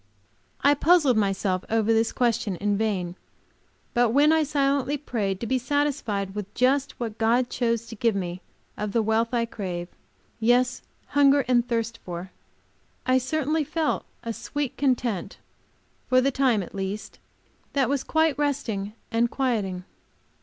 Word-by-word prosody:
I 285 - +5
puzzled 295 -3 +4
myself 195 -2 0
over 225 0 +2
this 225 0 +2
question 230 -5 0
in 205 +3 0
vain, 195 -5 -1 0.8
but 240 -1 +3
when 285 +6 +5
I 320 - +4
silently 280 -1 +1
prayed 210 -9 -2
to - - -2
be 255 +2 +1
satisfied 250 -8 -1
with 205 -1 -5
just 270 +2 +1
what 225 -3 -4
God 240 +2 +2
chose 230 -2 0
to 230 - -9
give 225 0 +1
me 180 -1 -3 0.3
of 210 -1 -4
the 230 - +2
wealth 220 +2 +1
I 235 -2 +1
crave, 180 -6 -5 0.5
yes, 245 +2 +2 0.3
hunger 280 -1 +4
and 245 -1 +3
thirst 230 -1 -2
for, 180 +1 -6 0.7
I 255 0 +4
certainly 305 +4 0
felt 315 +1 -1 0.2
a 230 -1 -3
sweet 290 +2 -4
content, 245 -8 -1 0.7
for 255 - +5
the 270 +2 +2
time, 255 -6 +2
at - - -11
least, 195 +1 -5 0.5
that 275 -2 +2
was 280 -1 0
quite 315 -2 +2
resting 230 -9 -1 0.2
and 235 +1 +2
quieting. 210 -10 -1
235 Hz, 150 wpm, -25 LUFS, 210-275 Hz, 0.8 s, I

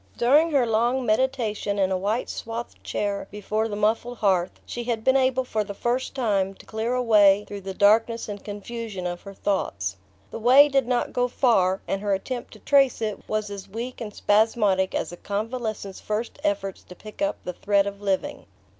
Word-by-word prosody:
During 290 +7 +4
her 275 -5 +3
long 240 +3 +1
meditation 220 -3 0
in 190 -1 +2
a - - +2
white 205 +6 -1
swathed 230 +1 -6
chair 200 -1 -2
before 210 +2 -2
the 210 - -4
muffled 225 +3 0
hearth 185 -4 +1
she 240 0 -5
had 230 -2 -2
been 260 +2 +4
able 260 -1 +2
for 220 -4 -1
the 200 -1 -7
first 245 +5 -1
time 200 -7 0
to - - -16
clear 225 +3 -2
a 250 - 0
way 205 -3 +5
through 205 -1 -7
the 190 0 -6
darkness 225 +3 +3
and 205 -1 -7
confusion 205 -1 -6
of 175 0 -3
her 200 -1 -10
thoughts. 95 - -2 0.3
The - - -5
way 260 +6 +7
did 270 -3 +1
not 245 -1 0
go 245 0 +1
far, 195 -8 +2
and 195 - -2
her 205 -1 +1
attempt 240 +5 -5
to - - -14
trace 275 -3 +3
it 215 -2 -2
was 215 -1 -1
as 200 -1 -8
weak 235 +5 -6
and 215 -2 -5
spasmodic 205 -3 +2
as - - -2
a 175 - -9
convalescent's 215 -1 -4
first 215 +6 -4
efforts 300 -11 -1
to 180 - -12
pick 215 +8 -12
up 295 0 0
the 180 - -4
thread 200 +2 +2
of 200 0 -6
living. 205 +9 -2
215 Hz, 200 wpm, -25 LUFS, 200-245 Hz, 0.3 s, way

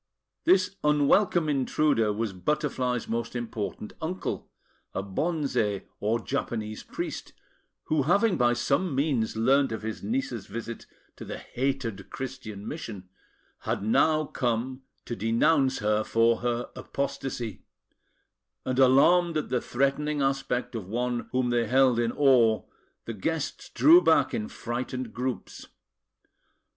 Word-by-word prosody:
This 185 +1 +3
unwelcome 150 +4 +3
intruder 135 -4 +2
was 105 -1 -2
Butterfly's 125 - -1
most 115 +1 -3
important 110 -3 -4
uncle, 180 +4 -4 0.5
a 95 - -1
Bonze, 110 - -1 0.2
or 110 +3 +1
Japanese 110 -4 -3
priest, - - -6 0.5
who, 155 -2 +1
having 200 - +3
by 120 -4 +3
some 140 +5 0
means 135 -6 0
learnt 135 +3 +3
of 110 - -4
his 110 0 -4
niece's 175 - -3
visit 115 +2 -7 0.3
to - - -8
the - - -6
hated 125 -6 -3
Christian 125 -6 -7
mission, 105 - -7 0.5
had - - -2
now 155 +8 +3
come 125 0 -2 0.2
to 120 - -4
denounce 130 +5 +2
her 105 0 +1
for 115 +1 +3
her 120 0 -2
apostasy; 130 -6 -4 1.0
and, 130 0 -1
alarmed 160 +6 +5
at 155 - -3
the 125 -2 0
threatening 140 +3 0
aspect 135 -2 -1
of 110 -6 -5
one 120 +2 -2
whom 125 -1 +1
they 120 -1 +1
held 130 0 +4
in 115 -1 +1
awe, 120 -6 +4 0.4
the 115 - -4
guests 155 +8 -3
drew 335 +4 +7
back - - +3
in 220 -1 -2
frightened 125 - -4
groups. 125 +1 -4
125 Hz, 130 wpm, -27 LUFS, 115-145 Hz, 1.0 s, drew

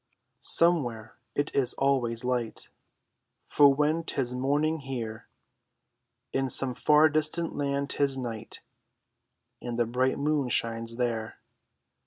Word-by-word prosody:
Somewhere 120 -6 +1 0.2
it 145 - -1
is 130 -3 +2
always 125 -4 0
light; 125 -3 -2 0.8
For 145 -1 +5
when 150 +4 +1
'tis 130 -6 -2
morning 145 +5 0
here, 120 -5 -6 1.1
In 135 0 0
some 130 +1 +2
far 150 +5 +5
distant 155 +2 0
land 140 0 -2
'tis 140 -2 +1
night, 115 -4 -6 1.0
And 120 -1 -5
the 120 - +2
bright 130 +3 0
moon 145 -2 0
shines 115 0 -1
there. 115 -2 -2
135 Hz, 115 wpm, -28 LUFS, 120-145 Hz, 1.1 s, For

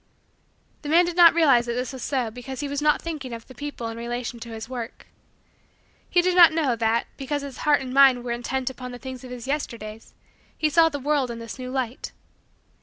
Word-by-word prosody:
The 290 - -6
man 340 +3 +5
did 345 -1 -3
not 340 -2 +7
realize 270 -8 +4
that 235 - -1
this 250 +2 -3
was 260 - -8
so 250 -5 -1
because 255 +3 -7
he 290 - -3
was 285 +1 -3
not 300 0 +2
thinking 295 -7 -5
of 230 -1 -8
the 260 - -13
people 290 -3 -6
in 225 - -5
their 235 - -6
relation 240 0 -4
to 235 - -8
his 225 0 -7
work. 240 -2 -7 1.0
He 350 - +3
did 365 0 +1
not 345 -2 +9
know, 305 -7 +1
that, 230 0 +1
because 285 +1 -3
his 275 -2 -8
heart 290 -2 +5
and 255 -1 -6
mind 265 -3 +6
were 245 - -4
intent 255 +2 -2
upon 250 -1 -8
the - - -7
things 260 0 -8
of 255 - -9
his 245 -2 -7
Yesterdays, 230 -6 -5 0.4
he 305 -1 +1
saw 325 +1 +5
the 290 - -4
world 285 -2 0
in 235 - -5
this 230 +2 -8
new 255 0 -5
light. 255 -1 -4
260 Hz, 230 wpm, -24 LUFS, 240-290 Hz, 1.0 s, not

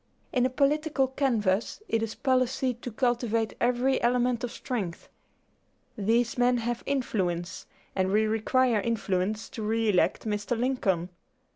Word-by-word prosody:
"In 250 -1 +3
a - - -5
political 280 0 +1
canvass 230 -7 0
it 225 - 0
is 225 -1 -3
policy 255 0 +1
to 245 +1 -8
cultivate 230 -2 0
every 250 +2 +2
element 245 0 +1
of 245 - -2
strength. 205 -10 -4 0.9
These 230 +4 +1
men 245 0 +4
have 235 0 -2
influence, 185 -11 -2 0.3
and 190 -1 +1
we 215 +2 +3
require 225 +1 +2
influence 210 -1 -1
to 225 - -7
re 225 +1 +1
elect 185 +2 +2
Mr. 210 +2 -1
Lincoln. 195 -9 0
235 Hz, 135 wpm, -28 LUFS, 210-255 Hz, 0.9 s, men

